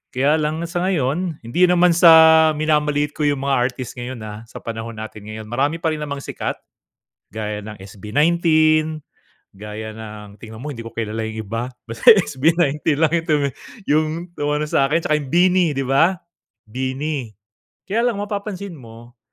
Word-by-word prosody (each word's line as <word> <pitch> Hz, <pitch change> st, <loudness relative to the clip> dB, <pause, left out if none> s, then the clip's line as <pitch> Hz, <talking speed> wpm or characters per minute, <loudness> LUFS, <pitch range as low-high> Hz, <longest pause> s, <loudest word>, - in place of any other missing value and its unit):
Kaya 145 Hz, +5 st, +2 dB
lang 155 Hz, +2 st, -2 dB
sa 170 Hz, +1 st, -3 dB
ngayon, 165 Hz, -1 st, -1 dB
hindi 175 Hz, +11 st, +3 dB
naman 180 Hz, 0 st, +4 dB
sa 160 Hz, -2 st, +7 dB
minamaliit 150 Hz, -1 st, +1 dB
ko 150 Hz, 0 st, -1 dB
'yong 145 Hz, -2 st, 0 dB
mga 140 Hz, 0 st, +1 dB
artist 125 Hz, -1 st, -8 dB
ngayon, 125 Hz, 0 st, -6 dB
ah, 110 Hz, +1 st, -9 dB
sa -, -, -11 dB
panahon 115 Hz, 0 st, -6 dB
natin 110 Hz, -1 st, -9 dB
ngayon. 110 Hz, 0 st, -7 dB
Marami 140 Hz, +6 st, 0 dB
pa 160 Hz, -, +2 dB
rin 155 Hz, -, -3 dB
namang 140 Hz, -2 st, -5 dB
sikat -, -, -4 dB, 0.8 s
gaya 105 Hz, -1 st, -3 dB
ng 110 Hz, 0 st, -8 dB
SB19, 155 Hz, -, +1 dB, 0.5 s
gaya 105 Hz, +2 st, -7 dB
ng 105 Hz, -2 st, -10 dB
tingnan 110 Hz, -1 st, -10 dB
mo 150 Hz, -, -5 dB
hindi 115 Hz, -, -7 dB
ko 115 Hz, -, -9 dB
kilala 110 Hz, -1 st, -4 dB
'yong 110 Hz, -1 st, -6 dB
iba, 115 Hz, +4 st, -4 dB, 0.2 s
basta 115 Hz, 0 st, +5 dB
SB19 160 Hz, -4 st, +2 dB, 0.2 s
lang 160 Hz, -1 st, +2 dB
'yong 165 Hz, -1 st, 0 dB
tumi 145 Hz, -2 st, +2 dB, 0.4 s
'yong 155 Hz, +1 st, +2 dB, 0.3 s
umano 150 Hz, +1 st, 0 dB
sa'kin 150 Hz, +3 st, +1 dB
tsaka 155 Hz, -, +2 dB
'yong 140 Hz, -3 st, -8 dB
BINI, 180 Hz, +2 st, +4 dB
'di 135 Hz, -, 0 dB
ba? 165 Hz, +8 st, +3 dB, 0.5 s
BINI. 130 Hz, +6 st, -3 dB, 0.7 s
Kaya 230 Hz, +5 st, +1 dB
lang, 215 Hz, -4 st, -1 dB
mapapansin 200 Hz, -4 st, -5 dB
mo 120 Hz, 0 st, -14 dB
145 Hz, 165 wpm, -20 LUFS, 115-160 Hz, 0.8 s, sa